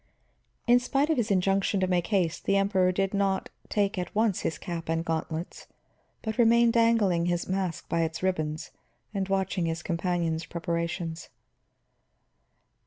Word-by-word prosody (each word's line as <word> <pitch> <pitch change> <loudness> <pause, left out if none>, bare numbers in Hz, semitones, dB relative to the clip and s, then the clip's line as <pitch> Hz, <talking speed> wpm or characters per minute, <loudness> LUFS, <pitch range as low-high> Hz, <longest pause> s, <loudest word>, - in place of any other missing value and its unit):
In 245 0 +6
spite 275 +5 +1
of 315 - +1
his 235 -4 0
injunction 195 +1 +2
to 190 - +2
make 180 -2 0
haste, 180 -6 0
the 195 - +3
Emperor 190 -2 +3
did 195 +2 -1
not 195 -1 0 0.2
take 200 -2 0
at 180 - -5
once 215 -3 +2
his 160 - -2
cap 165 -2 -6
and 165 +1 0
gauntlets 160 +1 -4 0.6
but 220 +1 -4
remained 235 0 +5
dangling 220 -7 +3
his 175 -1 -1
mask 185 -4 -2
by 170 - 0
its 160 +1 -2
ribbons 155 -5 -1 0.4
and 195 -2 -2
watching 190 -2 0
his 165 +1 -3
companion's 170 -2 -1
preparations. 170 0 -3
185 Hz, 150 wpm, -28 LUFS, 170-200 Hz, 0.6 s, In